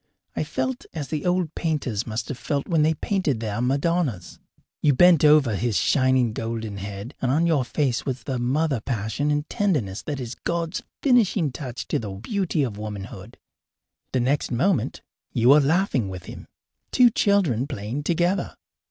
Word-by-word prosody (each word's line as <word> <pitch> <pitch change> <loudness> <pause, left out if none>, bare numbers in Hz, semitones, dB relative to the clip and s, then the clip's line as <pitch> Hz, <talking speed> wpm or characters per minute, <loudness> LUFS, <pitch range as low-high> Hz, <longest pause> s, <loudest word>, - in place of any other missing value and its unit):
I - - 0
felt 260 -1 -3
as 145 -4 -4
the 155 +1 -2
old 180 -3 0
painters 135 - -2
must 110 +1 -3
have 140 - -4
felt 140 -2 -2
when 165 -3 +2
they 160 +1 +3
painted 155 - -1
their 110 0 -3
Madonnas. 140 - -1 0.4
You 145 -3 +4
bent 175 +2 +6
over 150 -6 +5
his 110 +1 0
shining 130 -4 +2
golden 115 -2 -4
head, 100 +5 -6
and 130 - 0
on 160 +5 +2
your 160 -6 +2
face 125 -1 -1
was 130 -2 -4
the 130 -3 -3
mother 135 +2 +1
passion 115 +4 -2
and 150 +1 0
tenderness 145 - -1
that 145 -3 -4
is 125 -1 -5
God's 170 +5 -3 0.2
finishing 215 - +3
touch 125 -2 -6
to - - +1
the 110 - -5
beauty 160 - -1
of 110 -6 -4
womanhood. 105 -1 -7 0.7
The 130 - +1
next 140 +4 +1
moment 140 - 0 0.3
you 120 +1 +3
were 145 +2 +8
laughing 145 - +1
with 90 -1 -7
him - - -10 0.4
two 245 -2 +6
children 175 - +2
playing 110 +4 -4
together. 175 +5 0
135 Hz, 170 wpm, -24 LUFS, 115-165 Hz, 0.7 s, were